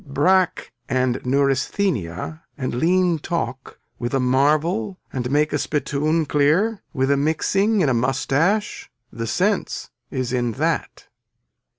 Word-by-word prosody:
Brack 180 +6 +1 0.2
and 130 -1 +1
neuresthenia 135 - 0 0.2
and 130 -3 -3
lean 175 +5 +2
talk 145 -5 -4 0.2
with 120 +3 -2
a - - +2
marvel 155 - +1
and 125 -2 -2
make 150 +2 +2
a - - +1
spittoon 155 +2 0
clear 160 +10 +2
with 135 -2 0
a 140 - +3
mixing 195 +8 +1
in 155 - +3
a 130 - +2
mustache. 140 - 0 0.2
The 115 0 -4
sense 195 - -1 0.2
is 130 -2 -3
in 120 -2 0
that. - - -2
145 Hz, 125 wpm, -22 LUFS, 130-175 Hz, 0.2 s, a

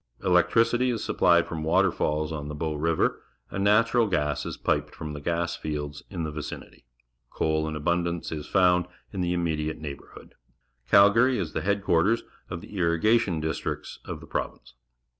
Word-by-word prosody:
Electricity 115 +7 +3
is 120 -3 -2
supplied 85 -1 +3
from 80 -2 -5
waterfalls 80 -3 +1
on 75 -2 -5
the 75 - -5
Bow 80 +1 -2
River, 80 +2 0 0.3
and 95 - -2
natural 115 +3 +4
gas 75 -7 -1
is - - -5
piped - - -1
from 75 -1 -6
the 75 - -7
gas 85 +2 -1
fields 75 -1 -5
in 90 -4 -4
the 80 - -3
vicinity. 75 0 -8 0.4
Coal 80 0 0
Jn 80 - -4
abundance 85 +2 -1
is 75 -2 -5
found 90 -2 +3 0.3
in 95 - -2
the 90 0 0
immediate 80 -3 -1
neiglibourhood. 70 -3 -9 0.6
Calgary 115 +6 +6
is 85 -6 -3
the - - -1
headquarters 100 +1 +2 0.3
of 85 -2 -5
the 100 - -8
irrigation 90 +2 +2
districts 80 +1 -4
of - - -7
the - - -10
province. - - -5
85 Hz, 160 wpm, -26 LUFS, 80-100 Hz, 0.6 s, Calgary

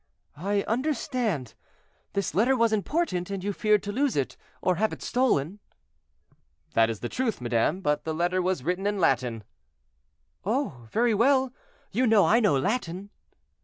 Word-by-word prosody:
"I 200 +6 -1
understand. 240 - -1 0.6
This 200 -6 -1
letter 240 +9 +3
was 230 -1 +3
important, 210 - -1
and 195 -2 -4
you 205 +1 -1
feared 210 0 +2
to 205 - -3
lose 270 +4 0
it, 140 -2 -1 0.2
or 180 -1 +1
have 220 +1 +1
it - - -7
stolen." 210 - +1 1.1
"That 115 0 +4
is 115 - -4
the 120 - -2
truth, 245 - -2
madame; 120 +9 0
but 150 -5 0
the 160 -1 -3
letter 175 +3 +1
was 180 -7 -1
written 180 +5 -1
in 205 0 0
Latin." 125 - +1 1.0
"Oh, 195 - -2
very 235 - +2
well; 260 +3 +3 0.4
you 255 +1 +2
know 220 -3 +5
I 230 - +4
know 205 - +3
Latin." 195 - -2
200 Hz, 160 wpm, -27 LUFS, 160-235 Hz, 1.1 s, know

